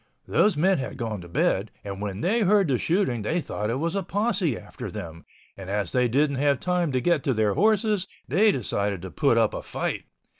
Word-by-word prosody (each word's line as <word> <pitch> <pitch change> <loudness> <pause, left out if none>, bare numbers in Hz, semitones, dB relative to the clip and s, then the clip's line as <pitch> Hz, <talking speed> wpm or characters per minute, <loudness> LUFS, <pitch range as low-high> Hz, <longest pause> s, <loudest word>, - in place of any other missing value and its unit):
Those 210 -6 +3
men 185 +2 +3
had 130 0 -5
gone 110 -6 -3
to 85 - -10
bed 95 +4 0
and 100 -1 -6
when 100 0 -4
they 215 +7 +2
heard 205 -2 +4
the 125 -3 +1
shooting 165 - +1
they 105 +11 0
thought 105 -8 -3
it 115 - 0
was 165 +5 -1
a 195 - 0
posse 190 - 0
after - - -8
them, 85 0 -8 0.3
and 95 -1 -9
as 100 -3 -1
they 125 -1 +2
didn't 140 +3 +1
have 140 0 +2
time 180 -3 0
to 130 - +2
get 170 -4 +2
to 135 - +1
their 105 -2 +2
horses, 210 - +2 0.2
they 205 - +4
decided 100 - -2
to - - -7
put - - +2
up - - +3
a - - -4
fight. - - -3
140 Hz, 220 wpm, -25 LUFS, -, 0.3 s, heard